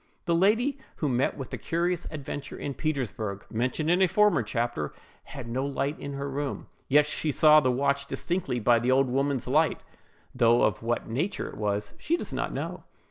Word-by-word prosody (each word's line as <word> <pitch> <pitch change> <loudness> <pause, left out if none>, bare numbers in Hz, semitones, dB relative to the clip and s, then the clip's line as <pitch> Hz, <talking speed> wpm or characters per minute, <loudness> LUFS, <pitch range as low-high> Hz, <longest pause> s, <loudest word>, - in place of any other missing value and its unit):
The 170 - +1
lady 225 +11 +2 0.2
who 150 - -1
met 125 0 +1
with 135 -3 -7
the - - -4
curious 175 +1 -1
adventure 145 -2 -6
in 140 - -4
Petersburgh, 115 - -3
mentioned 130 +8 0
in 180 +2 +3
a 190 - +6
former 210 -2 +4
chapter, 115 -8 -2 0.3
had - - -8
no 125 +3 -2
light 140 +1 -2
in 140 - -5
her 140 0 -4
room; 140 0 -3 0.2
yet 145 +2 +5
she 150 +1 -2
saw 155 +2 +7
the 130 -4 +1
watch 140 +2 0
distinctly 175 -8 -2
by 120 +1 +4
the 120 +2 -1
old 130 -1 +3
woman's 135 -1 0
light, 155 +5 +2 0.5
though 120 +1 +4
of - - +1
what 120 +1 -1
nature 155 - -2
it - - -10
was, 105 -1 -2
she 335 +3 0
does - - -6
not - - -2
know. - - -5
140 Hz, 190 wpm, -27 LUFS, 120-160 Hz, 0.5 s, saw